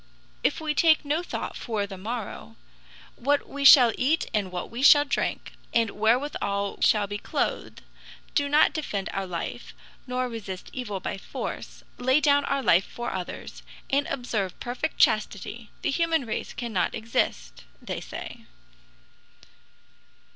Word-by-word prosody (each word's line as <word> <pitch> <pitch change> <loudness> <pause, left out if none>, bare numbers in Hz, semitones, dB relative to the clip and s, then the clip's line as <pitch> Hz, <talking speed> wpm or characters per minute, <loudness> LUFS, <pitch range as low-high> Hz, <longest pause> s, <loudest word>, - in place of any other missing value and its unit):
"If - - +1
we 310 -1 -1
take 315 -1 +4
no 300 +4 0
thought 355 - -5
for 215 -3 -2
the 200 -1 -8
morrow, 195 - -6 0.6
what 285 +3 +1
we 280 0 -5
shall 250 -4 +9
eat 295 +6 +2
and 200 -3 0
what 180 -1 -5
we 235 +2 -5
shall 290 +1 +8
drink, - - -2 0.2
and 230 -3 +3
wherewithal 215 -4 0
we - - -23
shall 210 -2 +4
be 205 +1 -5
clothed, - - -3 0.5
do 285 -1 +1
not 300 +2 +5
defend 205 - -3
our 195 -1 -2
life, 170 -2 -5 0.3
nor 255 0 -1
resist 205 -6 -7
evil 210 -7 -4
by 195 - -4
force, - - -6 0.2
lay 260 +3 +4
down 285 -1 +3
our 275 -1 -1
life 180 -3 +4
for 240 0 -5
others, 185 -2 -6 0.3
and 280 +1 +2
observe 220 -8 -3
perfect 255 +6 -3
chastity, 215 +1 +1
the - - +1
human 325 -2 +1
race 220 - -4
cannot 230 -7 -1
exist," 225 0 -2 0.2
they - - -5
say. - - -8
240 Hz, 145 wpm, -26 LUFS, 200-285 Hz, 0.6 s, shall